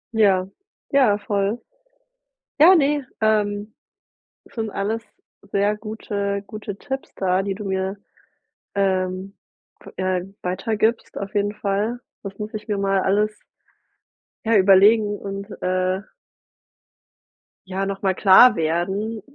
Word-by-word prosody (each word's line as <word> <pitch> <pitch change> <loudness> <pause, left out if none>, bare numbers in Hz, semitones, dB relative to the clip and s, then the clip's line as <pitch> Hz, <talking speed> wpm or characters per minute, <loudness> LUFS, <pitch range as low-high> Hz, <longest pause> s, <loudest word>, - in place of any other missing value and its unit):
Ja, 195 -4 +3 0.4
ja 260 -7 +4
voll. 205 +2 -1 1.0
Ja, 335 +5 +9
ne, 290 -4 +2 0.2
ähm, 210 -1 0 0.8
sind 225 -3 -3
alles 210 +3 -2 0.5
sehr 205 +1 +2
gute 205 -2 -4
gute 205 -1 -7
Tipps 270 +5 -6
da, 185 0 +1
die 195 0 -3
du 210 +1 -7
mir, 190 +1 -2 0.8
ähm, 190 -1 -1 0.5
ve - - -12
ja 185 -1 0 0.2
weitergibst 215 +5 -1
auf 200 +1 -6
jeden 205 0 +1
Fall. 210 +4 -2 0.2
Das 195 -1 -8
muss 210 +1 -6
ich 215 - -6
mir 210 -3 -1
mal 195 -1 +1
alles 210 +2 +1 1.1
ja 225 0 +4
überlegen 205 +2 +5
und, 200 +1 -6
äh 185 +1 0 1.7
ja, 190 +1 -2
nochmal 195 -1 -1
klar 205 +7 +7
werden, 190 +7 -1
200 Hz, 115 wpm, -22 LUFS, 195-215 Hz, 1.7 s, Ja